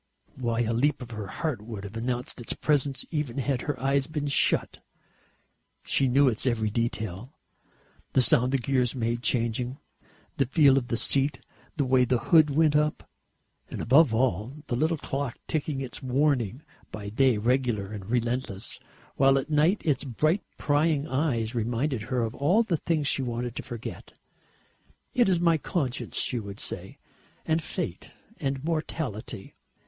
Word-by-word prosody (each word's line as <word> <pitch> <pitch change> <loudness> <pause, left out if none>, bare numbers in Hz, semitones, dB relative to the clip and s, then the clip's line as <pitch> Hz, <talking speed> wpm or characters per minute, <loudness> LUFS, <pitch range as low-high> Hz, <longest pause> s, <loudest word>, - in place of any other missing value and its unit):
Why, 120 -2 -1
a 115 0 0
leap 135 +3 +1
of 120 - -11
her 105 -3 -5
heart 150 - -3
would 105 -2 -7
have 100 +2 -8
announced 120 +2 -3
its 115 - -3
presence, 140 -3 0
even 150 -6 -2
had 135 -1 0
her 145 -4 -3
eyes 135 +1 +1
been 150 -2 -3
shut. 140 - +1 1.0
She 135 - +2
knew 135 +3 +4
its 120 +1 0
every 110 -3 +1
detail, 110 - -3 0.8
the 130 - +5
sound 125 +2 +4
the 135 - +3
gears 130 -1 0
made 120 -1 -1
changing, 120 +1 0 0.6
the 135 - +2
feel 140 -1 +5
of 120 - -8
the 115 - -1
seat, 135 +3 +2 0.4
the 140 - +1
way 130 0 +4
the 125 0 +2
hood 155 +4 +5
went 150 +1 +3
up. 150 0 +1 0.6
And, - - -6
above 140 +2 +5
all, 125 - -1
the 120 - -2
little 160 +6 +1
clock, 135 -3 -4
ticking 150 -3 -2
its 130 -2 -6
warning 130 -2 0 0.3
by 100 -1 -6
day, 125 +1 +3
regular 115 -3 0
and 100 -1 -7
relentless, 120 -4 -2 0.4
while 135 0 +5
at 135 +3 -3
night 155 +7 +3
its 150 -4 +1
bright 155 - +1 0.2
prying 150 0 +1
eyes 130 -5 0
reminded 120 +2 -1
her 125 +2 -1
of 110 0 -3
all 175 - +3
the 180 -7 0
things 155 -2 -1
she 135 - +2
wanted 120 -1 -3
to - - -3
forget. 120 -2 -8 1.0
"It 245 -6 +3
is 180 -3 +3
my 170 -2 +3
conscience," 140 -6 -2
she 125 - 0
would 100 -1 -8
say, - - -5 0.5
"and 160 +1 +1
fate - - -5 0.3
and 135 0 -2
mortality. 155 -11 -4
130 Hz, 165 wpm, -27 LUFS, 115-145 Hz, 1.0 s, the